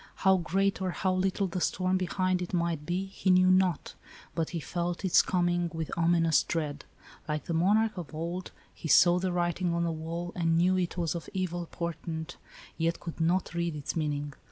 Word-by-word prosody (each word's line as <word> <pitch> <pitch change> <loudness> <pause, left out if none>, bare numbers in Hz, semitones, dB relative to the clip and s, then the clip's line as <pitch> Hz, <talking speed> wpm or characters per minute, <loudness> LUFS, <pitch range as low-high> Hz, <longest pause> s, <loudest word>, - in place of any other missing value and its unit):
How 190 0 +6
great 195 +4 0
or 185 - 0
how 185 +1 0
little 190 +2 0
the 180 0 -3
storm 185 +1 +1
behind 185 0 0
it 180 +1 -3
might 170 -3 -1
be 180 +2 -1
he 195 0 -3
knew 185 0 +6
not, 185 -4 +2 0.4
but 165 -1 -1
he 170 - -3
felt 175 +4 -3
its 180 - +6
coming 175 -1 0
with 160 -1 -4
ominous 165 -2 +3
dread. 150 -4 -3 0.4
Like 150 -1 -2
the 170 - -2
monarch 210 +6 +3
of 170 - -7
old, 170 +3 -4 0.2
he - - -7
saw 175 +4 +6
the 185 0 -1
writing 175 0 0
on 170 - 0
the 170 - 0
wall, 165 +2 -4
and 165 -2 +1
knew 180 +2 +3
it 180 -1 -1
was 170 -3 0
of 170 -2 -6
evil 175 -2 -2
portent, 165 0 -5 0.4
yet 165 +1 0
could 165 -1 -6
not 175 +3 +1
read 170 -2 -1
its 145 -2 -4
meaning. 145 -2 -2
175 Hz, 195 wpm, -29 LUFS, 165-185 Hz, 0.4 s, How